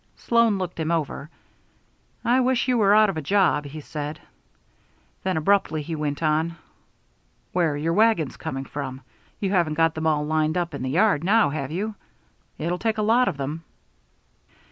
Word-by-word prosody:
Sloan 230 -3 +2
looked 180 -2 -5
him 160 0 -1
over. 155 -3 -2 1.0
"I 245 +2 +4
wish 255 0 +1
you 250 - +2
were 205 -3 +4
out 215 -1 +5
of 185 - -7
a - - -2
job," 155 -2 +2
he 145 +2 -7
said. 150 +1 -6 1.0
Then 185 -3 -1
abruptly 160 -2 +1
he 165 - -5
went 150 0 -3
on: 160 +2 +1 1.0
"Where 170 -4 +2
are - - -3
your 165 +3 -1
wagons 210 - +2
coming 135 +1 -5
from? 135 -2 -6 0.4
You 195 -2 -1
haven't 170 -5 +1
got 165 0 +3
them 160 0 -2
all 150 -1 +1
lined 155 +1 0
up 170 -2 -2
in 140 - -5
the 130 - -2
yard 180 +1 +2
now, 205 -4 +3
have 140 -3 -3
you? 205 +6 -3 0.6
It'll 175 +3 -2
take 225 -1 -1
a 215 - 0
lot 235 +4 +3
of 175 - -1
them." 145 +4 -4
165 Hz, 180 wpm, -24 LUFS, 150-200 Hz, 1.0 s, out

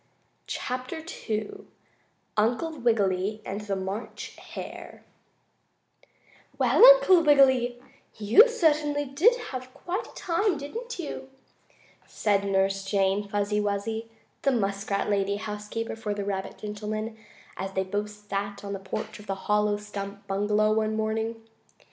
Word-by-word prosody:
CHAPTER 255 +6 -4 0.2
II 400 - -3 0.7
UNCLE 245 +9 0
WIGGILY 210 -3 +1
AND 200 +2 -4
THE 205 -2 -2
MARCH 190 +4 -5 0.2
HARE - - -8 1.5
"Well, - - +4
Uncle - - +9
Wiggily, 260 -5 +4 0.4
you 220 - +7
certainly 300 -9 +2
did 315 - +4 0.2
have 255 -1 -6
quite 370 +6 -4
a - - -16
time, 355 +1 +1
didn't 465 - -6
you," 295 -5 -6 0.8
said 200 -2 +1
Nurse 195 0 +1
Jane 195 +1 +1
Fuzzy 205 +1 0
Wuzzy, 215 +2 -2 0.3
the 275 - +3
muskrat 200 -3 -1
lady 200 -1 +1
housekeeper 210 +2 -4
for 215 -2 -3
the 200 -1 -3
rabbit 195 -1 -3
gentleman 215 +1 -4 0.4
as 190 +1 -5
they 190 - +1
both 205 +2 -2
sat 200 -1 -5
on 200 0 -4
the 195 - -4
porch 190 +2 -5
of 210 - -13
the 195 - -1
hollow 210 0 +2
stump 200 -1 -7
bungalow 210 +2 +2
one 220 0 +1
morning. 220 +1 -2
215 Hz, 130 wpm, -27 LUFS, 200-260 Hz, 1.5 s, Uncle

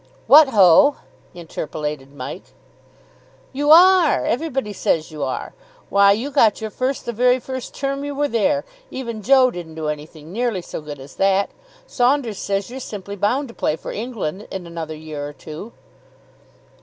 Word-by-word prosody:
"What 295 0 +8
ho!" 215 - +6 0.4
interpolated 150 -4 -5
Mike. 135 -3 -9 1.0
"You 290 +2 -1
are. 355 0 +6
Everybody 270 -6 -2
says 160 -4 -1
you 155 -1 -8
are. 130 -2 -3 0.4
Why, 200 0 +6
you 235 +8 -1
got 230 -7 +3
your 220 -1 -5
first 255 +3 -2
the 235 - -3
very 250 +3 +3
first 260 0 -7
term 275 0 -3
you 285 0 -4
were 290 +1 +1
there 280 +4 +1 0.2
even 235 -4 -6
Joe 255 +2 +5
didn't 170 -6 -8
do 155 -1 -3
anything 150 +1 -7
nearly 230 -5 -1
so - - -7
good 145 -2 -8
as 135 +2 -13
that. 195 0 +2 0.3
Saunders 250 - 0
says 200 +2 -2
you're 260 - -6
simply 200 -5 -7
bound 245 +8 0
to - - -11
play 155 - -1
for - - -8
England 210 -5 -5
in 190 -2 -6
another 165 -2 -6
year 155 -2 -7
or 145 - -9
two." 155 - -9
210 Hz, 165 wpm, -21 LUFS, 160-265 Hz, 1.0 s, What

